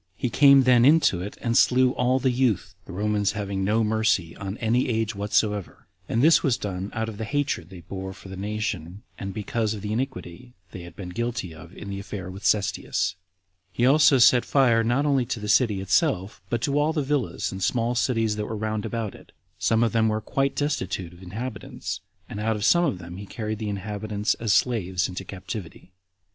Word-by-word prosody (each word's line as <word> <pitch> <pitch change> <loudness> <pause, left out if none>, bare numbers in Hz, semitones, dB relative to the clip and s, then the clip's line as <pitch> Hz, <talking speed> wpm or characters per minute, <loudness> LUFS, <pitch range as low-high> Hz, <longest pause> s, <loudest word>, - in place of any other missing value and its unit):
He 125 - -2
came 140 +2 +7
then 125 -2 +5
into 140 - +4
it, 100 +3 -6
and 115 -1 0
slew 130 0 +5
all 125 0 +1
the 130 0 +1
youth, 115 -8 0
the - - -10
Romans 105 +1 0
having 100 -2 -3
no 110 +3 +2
mercy 110 -6 +1
on 100 +2 -6
any 120 +3 +1
age 110 -1 0
whatsoever; 105 -1 -1 0.2
and 115 +3 +1
this 160 +2 +6
was 130 -6 +1
done 95 -3 -4
out 110 0 -1
of 110 -1 -7
the - - -2
hatred 135 - -2
they 95 -3 -11
bore 95 +3 -6
the 95 0 -7
nation, 100 -2 -4 0.2
and 95 -1 -4
because 110 +2 -2
of 105 - -8
the 105 0 -2
iniquity 125 -3 -5 0.2
they 90 - -8
had 85 -1 -11
been 95 -3 -7
guilty 115 -3 -3
of 85 +3 -13
in 100 - -7
the 100 - -4
affair 100 -1 -6
of 95 +2 -9
Cestius. 100 -2 +1 0.6
He 120 +6 +1
also 140 +1 +6
set 125 0 +6
fire 120 -5 +3
not 120 +5 +1
only 140 -3 +2
to 120 - -3
the 105 - -5
city 105 -2 +3
itself, 105 - 0
but 120 -1 -1
to 145 0 +1
all 150 +2 +2
the 150 -3 0
villas 140 -3 -1
and 95 0 -5
small 120 +3 +1
cities 115 -3 0
that 105 - -3
were 110 - -4
round 110 0 -2
about 115 -3 -3
it; - - -16 0.3
some 115 +1 +2
of 115 - +1
them 110 -1 +2
were 110 0 0
quite 135 +5 -1
destitute 95 - -2
of 90 - -16
inhabitants, 110 +5 -6 0.3
and 105 - -7
out 110 +1 0
of 105 0 -2
some 175 0 +5
of 135 - -1
them 85 0 -9
he 100 +1 -8
carried 110 -1 -4
the 110 -2 -3
inhabitants 105 +1 -2
as 115 -2 0
slaves 95 -4 +1
into 90 +1 -6
captivity. 95 -1 -8
110 Hz, 205 wpm, -25 LUFS, 95-125 Hz, 0.6 s, came